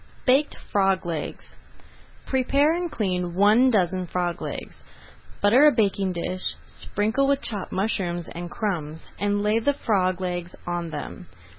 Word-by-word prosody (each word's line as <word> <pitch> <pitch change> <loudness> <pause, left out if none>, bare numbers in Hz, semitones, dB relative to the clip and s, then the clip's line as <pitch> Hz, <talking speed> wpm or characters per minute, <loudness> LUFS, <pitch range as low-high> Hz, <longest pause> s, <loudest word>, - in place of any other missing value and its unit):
BAKED 275 +3 +3
FROG 195 -2 +2
LEGS 165 -3 -5 0.7
Prepare 275 +4 +2
and 345 -1 -2
clean 180 -4 -2
one 215 +7 +5
dozen 185 -4 +1
frog 175 0 -2
legs. - - -7 0.6
Butter 245 +9 +7
a - - +7
baking 200 -5 +1
dish, 180 +2 -2
sprinkle 220 +7 0
with 280 0 +1
chopped 205 -5 -3
mushrooms 185 -4 -1
and 175 0 -6
crumbs, 160 -8 -4
and 205 0 0
lay 210 +2 +2
the 285 +5 +1
frog 185 -7 +1
legs 175 -1 -4
on 175 -1 -3
them. 115 - -7
195 Hz, 140 wpm, -25 LUFS, 175-225 Hz, 0.7 s, Butter